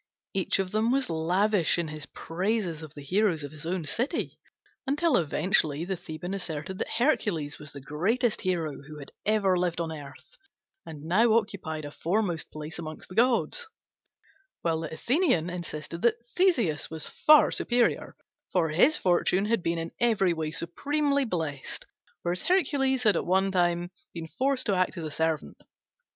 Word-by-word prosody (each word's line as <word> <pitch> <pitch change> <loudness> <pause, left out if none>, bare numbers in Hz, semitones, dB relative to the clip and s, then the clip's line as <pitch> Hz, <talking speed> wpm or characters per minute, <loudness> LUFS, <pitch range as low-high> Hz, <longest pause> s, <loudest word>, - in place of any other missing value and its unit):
Each 190 -2 +1
of 190 -1 -2
them 215 +2 +1
was 265 -6 +1
lavish 180 +4 +2
in 170 -2 -1
his 155 -2 -6
praises 180 -1 -2
of 155 -2 -10
the 145 - -9
heroes 180 0 +1
of 145 - -6
his 155 +1 -8
own 175 -2 -2
city, 255 - -1 0.5
until 300 +4 +2
eventually 160 -1 +1
the 190 +1 -2
Theban 175 +1 -6
asserted 180 -1 -4
that - - -1
Hercules 205 - +1
was 150 0 -9
the 140 - -9
greatest 210 - 0
hero 165 -7 -1
who 150 +2 -11
had 140 -2 -9 0.2
ever 205 -3 +3
lived 175 -1 0
on 165 -1 -2
earth, 140 -4 -11 0.5
and 150 -2 -8
now 215 +8 +4
occupied 185 -8 -1
a 145 - -7
foremost 175 0 -1
place 155 +2 -7
among 155 -1 -6
the - - -11
gods; 255 - +2 1.0
while 165 -1 +1
the 160 -1 -5
Athenian 235 - +1
insisted 170 -1 -6
that 235 - +4 0.2
Theseus 245 - +2
was 160 -1 -4
far 305 0 +5
superior, 240 -1 +1 0.4
for 170 -3 +2
his 220 - +4
fortune 185 +2 +2
had 225 -1 +1
been 170 0 -1
in 165 0 -4
every 215 -7 +3
way 160 -2 -2
supremely 280 - 0
blessed, 160 - -4 0.4
whereas 175 +1 -1
Hercules 270 -8 +2
had 210 -3 +4
at - - 0
one 190 +2 +3
time 175 -1 +1 0.2
been 165 -1 -6
forced 265 0 +1
to 205 - +2
act 185 0 +1
as 170 - -4
a 155 - -4
servant. 160 - -2
180 Hz, 165 wpm, -28 LUFS, 160-220 Hz, 1.0 s, far